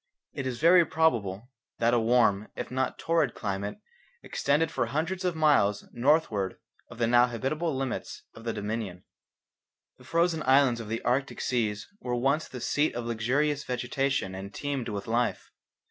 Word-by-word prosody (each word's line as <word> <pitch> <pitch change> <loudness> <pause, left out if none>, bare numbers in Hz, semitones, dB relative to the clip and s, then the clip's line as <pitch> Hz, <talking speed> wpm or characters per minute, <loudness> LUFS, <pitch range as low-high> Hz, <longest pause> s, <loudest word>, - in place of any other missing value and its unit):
It 135 - -3
is 125 -2 -4
very 170 +2 +7
probable 120 - 0 0.3
that 115 +1 +2
a 120 - +4
warm 110 -3 +3
if - - -5
not 130 0 0
a - - -36
torrid 165 -7 +1
climate 100 0 -3 0.5
extended 150 +3 +1
for 120 - -1
hundreds 165 - -2
of 180 -2 0
miles 145 -10 +3
northward 120 - +1 0.3
of 120 - -11
the 115 - +2
now 120 +1 +5
habitable 135 +7 -2
limits 130 -1 -4
of 115 - -12
the 115 - -1
Dominion. 105 -4 -4 1.0
The - - -15
frozen 170 -1 +1
islands 130 -3 +4
of 110 -2 -7
the 115 +1 -3
Arctic 135 +3 0
seas 110 -4 -1
were 125 -1 -2
once 135 +6 +1
the 125 - -8
seat 145 +3 +1
of 120 -1 -3
luxurious 135 +6 0
vegetation 125 -4 -1
and 95 +1 -7
teemed 140 -1 -3
with 100 -2 -4
life. 120 +1 -1
125 Hz, 165 wpm, -28 LUFS, 115-145 Hz, 1.0 s, very